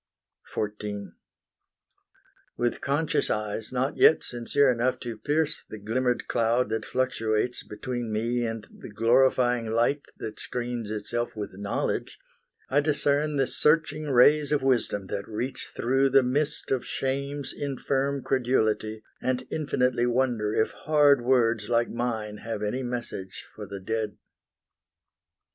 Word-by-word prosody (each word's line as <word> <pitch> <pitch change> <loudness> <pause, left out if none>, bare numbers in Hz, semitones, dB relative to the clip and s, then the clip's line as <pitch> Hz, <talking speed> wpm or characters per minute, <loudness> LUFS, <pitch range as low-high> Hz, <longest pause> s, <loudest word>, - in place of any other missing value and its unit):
XIV 105 -3 -4 1.4
With 120 0 -1
conscious 145 +3 0
eyes 105 +1 -2
not 130 +2 -1
yet 160 - +6
sincere 125 +3 +2
enough 125 +1 0
To 120 -2 -4
pierce 150 +7 -1
the 110 - -7
glimmered 120 +4 -1
cloud 115 +1 +1
that 110 0 -2
fluctuates 120 -2 0
Between 120 +2 -5
me 120 +3 0
and 115 -2 -3
the - - -10
glorifying 120 +1 +3
light 120 +6 +1 0.2
That 110 - -6
screens 120 -3 -4
itself 110 +3 -3
with 105 -3 -5
knowledge, 100 +1 -2 0.5
I 140 - +3
discern 145 0 +1
The 135 -1 +3
searching 155 +1 +2
rays 145 +3 +5
of 150 -3 +2
wisdom 120 -6 +1
that 100 0 -3
reach 120 +5 -4
through 135 +3 +2
The 135 0 +5
mist 145 +4 0
of 130 -2 +1
shame's 140 +1 -3
infirm 140 0 -1
credulity, 110 -4 0 0.2
And 130 0 -1
infinitely 125 -5 +1
wonder 120 -4 +1
if 110 - +1
hard 145 -3 +4
words 115 -4 +2
Like 120 0 +2
mine 110 -3 -3
have 110 -1 -5
any 105 +5 -1
message 120 -6 -5
for 105 -1 -8
the 100 0 -6
dead. 110 +1 -3
120 Hz, 130 wpm, -27 LUFS, 110-135 Hz, 1.4 s, yet